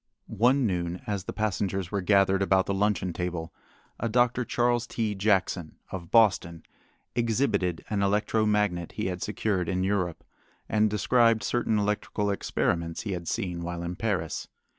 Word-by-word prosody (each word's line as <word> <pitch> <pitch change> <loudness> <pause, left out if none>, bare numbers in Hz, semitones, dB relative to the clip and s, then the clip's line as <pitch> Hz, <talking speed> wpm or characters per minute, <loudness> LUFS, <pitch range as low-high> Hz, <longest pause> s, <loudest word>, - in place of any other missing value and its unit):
One 125 +5 +2
noon 90 -3 -2
as 100 -3 -3
the - - -4
passengers 95 -3 -2
were 100 - -1
gathered 95 0 +3
about 95 -1 +3
the 100 - -1
luncheon 95 -3 0
table, 85 -2 -4 0.5
a 115 - -1
Dr. 120 +2 +2
Charles 120 0 +1
T. 110 -3 -1
Jackson, 95 -4 0 0.2
of 85 -3 -6
Boston, 95 -7 +3 0.5
exhibited 115 -7 0
an 100 -1 -1
electro 105 +2 +1
magnet 105 -5 0
he - - -3
had 90 -1 -3
secured 105 -4 -1
in 95 -1 0
Europe, 90 -4 -1 0.4
and 110 0 +2
described 115 +1 +3
certain 120 -3 +1
electrical 105 0 -1
experiments 85 -4 -1
he 105 - -4
had 85 -3 -4
seen 90 -2 -2
while 85 0 -4
in 85 +1 -4
Paris. 95 -7 -2
100 Hz, 155 wpm, -27 LUFS, 90-110 Hz, 0.5 s, gathered